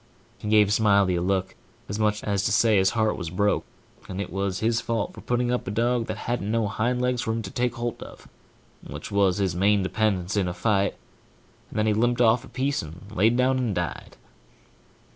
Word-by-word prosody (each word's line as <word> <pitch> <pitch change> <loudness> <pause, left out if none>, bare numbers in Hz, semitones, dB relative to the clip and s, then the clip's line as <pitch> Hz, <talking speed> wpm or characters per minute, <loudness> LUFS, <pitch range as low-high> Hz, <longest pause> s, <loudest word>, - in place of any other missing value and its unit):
He 105 - -6
give 105 -1 +4
Smiley 100 -4 +3
a - - -1
look, 95 +1 0 0.3
as 100 +2 -4
much 105 -1 +1
as 100 -2 0
to 115 - +1
say 110 0 +4
his 95 0 +4
heart 110 -1 +1
was 85 -3 -4
broke, 100 +4 0 0.4
and 95 - -5
it 100 - -4
was 95 -1 -1
his 115 +1 +1
fault 115 -2 -2
for - - -11
putting 120 0 0
up 125 - -2
a - - -1
dog 115 +2 0
that - - -4
hadn't 120 -4 -2
no 115 -1 +1
hind 120 +4 -1
legs 125 -1 0
for 110 - -2
him 115 0 -3
to 95 - -7
take 120 -1 -1
holt 120 -1 -4
of, - - -11 0.6
which - - -8
was 100 -2 +2
his 95 -4 0
main 100 +2 +3
dependence 95 -1 0
in 100 -3 +1
a 90 - -4
fight, 100 +1 +1 0.7
and - - -8
then 110 - +2
he 110 - +3
limped 120 +3 +1
off 115 0 +4
a - - -12
piece 135 +2 -1
and 85 +6 -11
laid 110 +5 +3
down 130 +1 +2
and 115 -6 -1
died. 90 -1 -4
105 Hz, 220 wpm, -25 LUFS, 95-115 Hz, 0.7 s, give